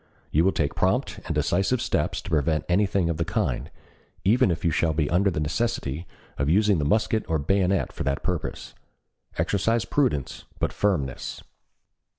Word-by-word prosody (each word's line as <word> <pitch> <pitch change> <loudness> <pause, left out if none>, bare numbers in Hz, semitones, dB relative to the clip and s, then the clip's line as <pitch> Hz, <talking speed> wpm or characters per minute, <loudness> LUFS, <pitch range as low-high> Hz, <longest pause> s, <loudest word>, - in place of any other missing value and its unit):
You 80 - +3
will 95 - +4
take 75 -6 -1
prompt - - 0
and - - -2
decisive 100 +6 +1
steps - - -1
to - - -8
prevent 75 0 +1
anything 95 -1 +2
of 85 -2 -1
the 85 - +1
kind, 65 -6 -1 0.5
even 105 +2 +4
if 85 -1 -2
you 85 - +3
shall 80 0 +1
be 75 -1 0
under 95 +3 +3
the 85 - -2
necessity 80 - -2 0.3
of 70 - +1
using 100 +1 +3
the 75 - 0
musket 110 +5 +2
or 80 - +2
bayonet 95 +5 +1
for - - -4
the 70 0 +1
purpose. - - -4 0.6
Exercise 115 +3 +1
prudence 120 - -1
but - - -1
firmness." 80 -11 -1
85 Hz, 165 wpm, -25 LUFS, 75-100 Hz, 0.6 s, will